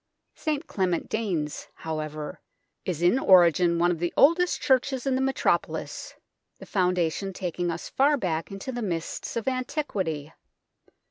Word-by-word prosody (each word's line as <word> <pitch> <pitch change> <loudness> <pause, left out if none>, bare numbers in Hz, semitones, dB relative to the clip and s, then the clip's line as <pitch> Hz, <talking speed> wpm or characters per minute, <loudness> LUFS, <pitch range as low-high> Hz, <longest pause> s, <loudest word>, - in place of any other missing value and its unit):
St 310 0 -2
Clement 190 - -1
Danes, 175 -10 -2
however, 155 -1 -5 0.5
is 175 -2 -2
in 180 +9 +4
origin 175 - +5
one 175 +1 +3
of 170 - -2
the 175 0 -1
oldest 335 +5 +4
churches 265 -1 +1
in 270 - +1
the 260 - +1
metropolis, 270 0 -1 0.4
the - - -11
foundation 180 0 0
taking 175 -1 -2
us 170 0 -4
far 285 +2 +3
back 165 -8 -2
into 195 +6 -6
the 245 -1 -4
mists 170 -6 -3
of 230 - -3
antiquity. 205 - -2
185 Hz, 140 wpm, -26 LUFS, 170-260 Hz, 0.5 s, origin